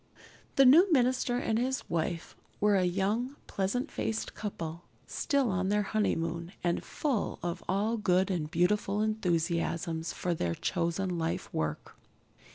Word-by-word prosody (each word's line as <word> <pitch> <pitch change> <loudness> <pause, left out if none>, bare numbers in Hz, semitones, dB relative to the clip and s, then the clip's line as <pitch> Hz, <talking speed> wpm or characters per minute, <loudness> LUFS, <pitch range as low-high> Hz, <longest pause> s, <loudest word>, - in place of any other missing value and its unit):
The 275 - +6
new 335 +9 +7
minister 255 -3 +2
and 225 -2 0
his 260 +2 -1
wife 165 0 -2 0.2
were 205 0 +4
a 185 -2 +3
young, 205 +9 0
pleasant 225 +9 -2
faced 220 - -2
couple, 170 -5 -5 0.2
still 280 -7 0
on 185 +1 0
their 210 0 +2
honeymoon, 170 -4 -1
and 175 -1 0
full 275 -8 -1
of 175 -1 -3
all 210 +5 +1
good 190 -2 +2
and 160 -5 -2
beautiful 195 +4 +1
enthusiasms 170 -5 -1
for 180 - -2
their 85 - -1
chosen 175 0 -1
lifework. 80 - -3
190 Hz, 135 wpm, -30 LUFS, 170-220 Hz, 0.2 s, new